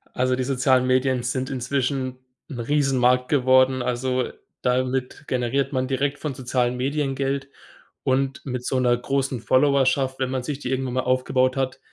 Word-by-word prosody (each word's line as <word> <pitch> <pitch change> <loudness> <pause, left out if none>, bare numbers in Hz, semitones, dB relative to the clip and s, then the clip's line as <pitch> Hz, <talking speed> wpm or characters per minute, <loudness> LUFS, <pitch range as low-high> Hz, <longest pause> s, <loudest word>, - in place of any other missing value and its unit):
Also, 130 0 +1
die 130 - -1
sozialen 130 -1 +2
Medien 130 -1 +2
sind 130 +2 -2
inzwischen 130 0 -2 0.3
'n 125 -5 -6
Riesenmarkt 125 -1 +2
geworden. 130 -1 +4
Also, 125 +1 -1 0.3
damit 130 +3 -1
generiert 135 +3 0
man 130 0 0
direkt 140 +2 -1
von 150 -3 -3
sozialen 125 -1 -1
Medien 135 +1 -1
Geld, 135 0 -2 0.5
und 135 +1 0
mit 125 -2 -4
so 130 - 0
'ner 120 -1 +3
großen 135 -1 -2
Followerschaft, 135 0 +2
wenn 130 - 0
man 130 - -1
sich 145 +1 -4
die 125 - -5
irgendwann 130 -1 -1
mal 130 - 0
aufgebaut 130 +1 +1
hat, 130 -1 -2
130 Hz, 160 wpm, -23 LUFS, 125-135 Hz, 0.5 s, geworden